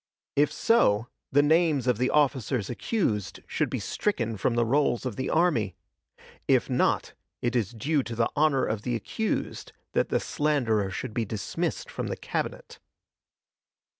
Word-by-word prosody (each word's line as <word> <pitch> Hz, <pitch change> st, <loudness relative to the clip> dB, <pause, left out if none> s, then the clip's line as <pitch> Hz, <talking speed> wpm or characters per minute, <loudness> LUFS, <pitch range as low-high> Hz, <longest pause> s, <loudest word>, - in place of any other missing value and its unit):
If 145 Hz, +1 st, +3 dB
so, 115 Hz, -, +3 dB, 0.2 s
the 145 Hz, +2 st, +5 dB
names 155 Hz, -3 st, +3 dB
of 125 Hz, -3 st, +1 dB
the 125 Hz, -, +2 dB
officers 130 Hz, -7 st, +1 dB
accused 120 Hz, -, -1 dB
should -, -, -1 dB
be -, -, -2 dB
stricken 115 Hz, -, -1 dB
from 115 Hz, +4 st, 0 dB
the 120 Hz, 0 st, +3 dB
rolls 130 Hz, 0 st, +1 dB
of 125 Hz, -5 st, -3 dB
the 130 Hz, -, -2 dB
army; 155 Hz, -, +2 dB, 0.7 s
if -, -, +3 dB
not, -, -, +1 dB, 0.3 s
it 120 Hz, 0 st, 0 dB
is 115 Hz, -6 st, +1 dB
due 140 Hz, +6 st, 0 dB
to 120 Hz, -2 st, -6 dB
the 115 Hz, 0 st, +1 dB
honor 145 Hz, -3 st, +3 dB
of 110 Hz, -1 st, -2 dB
the 120 Hz, +1 st, -2 dB
accused 220 Hz, -, -3 dB, 0.2 s
that -, -, +1 dB
the -, -, +2 dB
slanderer 125 Hz, -, +1 dB
should 100 Hz, -, -5 dB
be 115 Hz, -, 0 dB
dismissed 165 Hz, -, -3 dB
from -, -, -4 dB
the -, -, -3 dB
Cabinet. -, -, -4 dB
125 Hz, 160 wpm, -27 LUFS, 115-150 Hz, 0.7 s, the